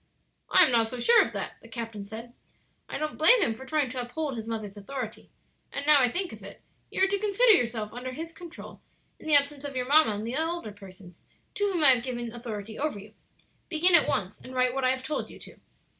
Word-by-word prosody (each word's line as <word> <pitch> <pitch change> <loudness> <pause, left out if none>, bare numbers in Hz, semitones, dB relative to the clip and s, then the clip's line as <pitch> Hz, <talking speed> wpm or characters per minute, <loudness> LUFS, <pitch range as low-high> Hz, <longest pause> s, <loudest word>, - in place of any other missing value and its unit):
"I 370 - +7
am 305 - 0
not 230 -2 +3
so 250 +3 -6
sure 470 - +6
of - - -1
that," - - -6
the - - -14
captain 225 -4 -6
said. 225 +3 -9 0.6
"I - - -4
don't 305 0 -4
blame 345 +11 +7
him 225 - 0
for 265 +4 -11
trying 290 -3 0
to 255 -1 -3
uphold 270 +3 -4
his 225 -1 -6
mother's 215 -3 -5
authority; 220 +2 -7 0.4
and 280 - -4
now 300 -1 +7
I 250 - +3
think 360 +7 -2
of - - -11
it, - - -12 0.3
you - - 0
are - - +5
to 400 +1 -1
consider 430 +4 +4
yourself 230 - +1
under 250 +2 -6
his 325 +5 -6
control 335 0 -11 0.4
in - - -11
the 305 - +5
absence 285 0 +2
of 285 -2 -6
your 250 -1 -1
mamma 285 -5 +4
and 210 +2 -5
the 235 +3 -3
older 325 -6 -2
persons 190 -3 -14 0.3
to 410 -1 0
whom 345 -4 0
I 285 - +8
have 245 -2 +2
given 240 -2 -5
authority 220 -3 -7
over 295 -5 -2
you. 205 +2 -12 0.6
Begin 350 +2 +3
at 340 - +6
once 195 -1 -2
and 255 - -11
write 255 -1 +2
what 270 0 -2
I - - +4
have 260 0 -1
told 300 +3 -3
you - - -12
to." - - -13
255 Hz, 240 wpm, -27 LUFS, 225-310 Hz, 0.6 s, I